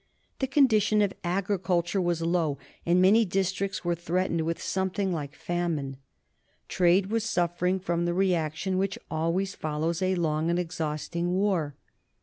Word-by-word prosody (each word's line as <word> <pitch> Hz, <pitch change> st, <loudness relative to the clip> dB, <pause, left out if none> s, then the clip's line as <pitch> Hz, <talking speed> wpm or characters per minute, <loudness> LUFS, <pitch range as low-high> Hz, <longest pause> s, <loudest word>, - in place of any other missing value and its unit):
The 265 Hz, -, 0 dB
condition 220 Hz, -6 st, +4 dB
of 195 Hz, -2 st, 0 dB
agriculture 185 Hz, 0 st, 0 dB
was 175 Hz, -2 st, 0 dB
low, 165 Hz, -4 st, +1 dB, 0.3 s
and 175 Hz, +1 st, +4 dB
many 200 Hz, +5 st, +6 dB
districts 195 Hz, -1 st, -1 dB
were 175 Hz, -, +2 dB
threatened 170 Hz, 0 st, -1 dB
with 165 Hz, +1 st, -2 dB
something 190 Hz, 0 st, -1 dB
like 145 Hz, -2 st, -5 dB
famine. 165 Hz, -6 st, -2 dB, 0.7 s
Trade 185 Hz, +2 st, +3 dB
was 225 Hz, -1 st, +1 dB
suffering 180 Hz, -2 st, 0 dB
from 175 Hz, -2 st, -1 dB
the 175 Hz, -, 0 dB
reaction 185 Hz, 0 st, 0 dB
which 195 Hz, 0 st, -1 dB
always 165 Hz, +5 st, 0 dB
follows 160 Hz, +2 st, -2 dB
a 185 Hz, 0 st, +2 dB
long 160 Hz, -2 st, 0 dB
and 170 Hz, -, +1 dB
exhausting 170 Hz, 0 st, -2 dB
war. 185 Hz, -7 st, 0 dB
175 Hz, 140 wpm, -27 LUFS, 165-190 Hz, 0.7 s, many